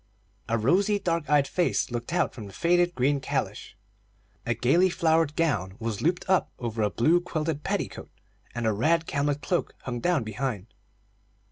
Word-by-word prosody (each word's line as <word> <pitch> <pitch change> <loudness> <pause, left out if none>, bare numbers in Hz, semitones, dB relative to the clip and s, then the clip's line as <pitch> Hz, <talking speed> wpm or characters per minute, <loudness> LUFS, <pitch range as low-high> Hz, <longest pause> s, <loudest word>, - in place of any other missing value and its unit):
A 115 - +2
rosy, 190 - +2
dark 170 -6 -2
eyed 145 -2 +4
face 175 -4 0
looked 120 +3 -4
out 175 - +1
from 110 -6 -8
the 100 - -12
faded 175 +1 +2
green 140 +3 +2
calash, - - -4 0.7
a 120 - +1
gayly 165 +11 +3
flowered 160 -3 +2
gown 95 - 0
was 115 -4 -4
looped 175 +3 0
up 190 0 +2
over 115 -2 -3
a 105 - +2
blue 160 - +3
quilted 155 -3 -3
petticoat, - - -3 0.5
and 120 -1 -2
a 110 - +2
red 160 +10 +2
camlet 145 0 -1
cloak 175 - -1
hung 120 -2 -4
down 170 -1 +1
behind. 110 -1 -4
145 Hz, 165 wpm, -27 LUFS, 115-170 Hz, 0.7 s, eyed